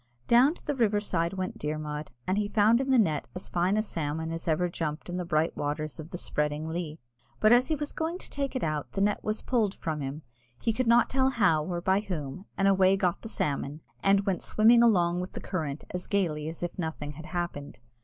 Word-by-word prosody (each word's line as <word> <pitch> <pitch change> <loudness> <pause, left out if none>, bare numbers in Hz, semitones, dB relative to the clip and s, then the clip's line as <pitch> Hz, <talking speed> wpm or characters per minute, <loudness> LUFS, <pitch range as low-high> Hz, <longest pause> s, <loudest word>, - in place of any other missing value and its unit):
Down 255 +7 +5
to - - -14
the 295 - 0
river 220 -6 +2
side 170 -4 -1
went 185 -1 -4
Dermod, 150 0 -4 0.2
and 190 +3 +1
he 210 - 0
found 215 +3 +4
in 270 - -3
the 260 - +5
net 160 -10 +2
as 180 - -7
fine 180 +4 +1
a 215 - +2
salmon 160 -4 -3
as 165 +1 -5
ever 165 +2 +2
jumped 160 -1 -4
in 175 - -3
the 180 - -3
bright 160 -1 +1
waters 150 +1 -3
of 155 +1 -7
"the 175 - -5
spreading 150 -2 -2
Lee;" 160 -2 -4 0.4
but 215 +2 +6
as 245 +1 +5
he 315 - +1
was 295 0 -3
going 325 +2 -2
to - - -11
take 280 -1 -3
it 260 - -1
out, 155 -2 -2
the 195 - -1
net 205 +1 +1
was 215 0 -2
pulled 220 -6 +1
from 155 -2 -3
him, 140 +3 -5 0.4
he 225 - 0
could 255 +2 -1
not 235 +1 +5
tell 265 0 +3
how 195 -12 +3
or 175 +1 -3
by 190 +2 +3
whom, 180 -4 -5
and 195 - +3
away 195 0 +5
got 180 -3 0
the 225 - -7
salmon, 145 -3 -2 0.2
and 195 0 +3
went 190 -3 0
swimming 230 +2 +5
along 175 -7 +4
with 180 - -6
the - - -5
current 155 -6 -4
as 180 0 -5
gaily 160 -7 0
as 165 +2 -7
if 175 +1 -4
nothing 160 -3 -3
had 155 +3 -10
happened. 170 - -4
180 Hz, 235 wpm, -28 LUFS, 155-215 Hz, 0.4 s, but